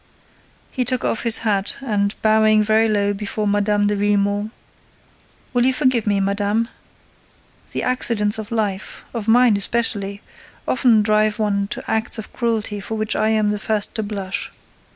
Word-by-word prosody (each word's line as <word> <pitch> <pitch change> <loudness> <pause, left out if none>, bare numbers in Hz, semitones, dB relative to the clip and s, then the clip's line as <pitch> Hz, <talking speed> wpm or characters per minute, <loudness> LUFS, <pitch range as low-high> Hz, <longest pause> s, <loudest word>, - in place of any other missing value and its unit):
He 255 - -1
took 250 0 -1
off 220 - 0
his 230 -2 +4
hat 200 -2 0
and, 205 -6 -1
bowing 215 0 +4
very 220 +1 +3
low 205 -1 +1
before 210 +1 -4
Mme. 205 0 +1
de 205 0 +1
Villemon: 205 0 0 1.0
"Will 245 -1 +2
you 260 +1 +3
forgive 255 -5 +1
me, 205 -1 +2
madame? 205 +3 0 1.0
The - - -2
accidents 220 -4 0
of 220 +1 -7
life—of 215 +1 -4
mine 235 -1 +5
especially—often 215 +2 -1
drive 215 0 +2
one 200 -2 0
to - - -6
acts 220 +1 0
of 220 - -8
cruelty 225 -3 -1
for 220 +3 -5
which 215 0 -1
I 215 +1 +1
am 215 -1 +2
the 210 - -2
first 210 -1 0
to 225 - -2
blush. 200 -3 -4
215 Hz, 150 wpm, -20 LUFS, 205-225 Hz, 1.0 s, mine